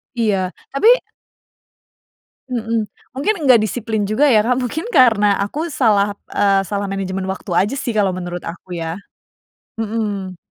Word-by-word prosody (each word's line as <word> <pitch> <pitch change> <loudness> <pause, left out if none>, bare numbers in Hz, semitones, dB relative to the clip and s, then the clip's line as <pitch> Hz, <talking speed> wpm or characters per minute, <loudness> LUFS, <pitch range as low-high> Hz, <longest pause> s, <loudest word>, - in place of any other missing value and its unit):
Iya, 195 -6 0 0.2
tapi 435 - +5 1.6
Mhm, 225 -2 -1 0.3
mungkin 290 +11 +1
gak 240 -4 +7
disiplin 220 -1 -2
juga 215 +9 +2
ya, 220 -6 +5
Kak. 250 +2 +1
Mungkin 290 - -3
karena 210 -5 +4
aku 300 +12 -2
salah, 205 -6 +2 0.2
eee, 195 -1 +3
salah 200 +1 -2
manajemen 190 -1 -3
waktu 190 0 -5
aja 205 +9 +2
sih 235 - -3
kalau 200 -3 +2
menurut 175 -1 -5
aku, 180 +1 -7
ya. 165 +2 -4 0.8
Mhm. 205 -4 -3
210 Hz, 135 wpm, -19 LUFS, 195-235 Hz, 1.6 s, gak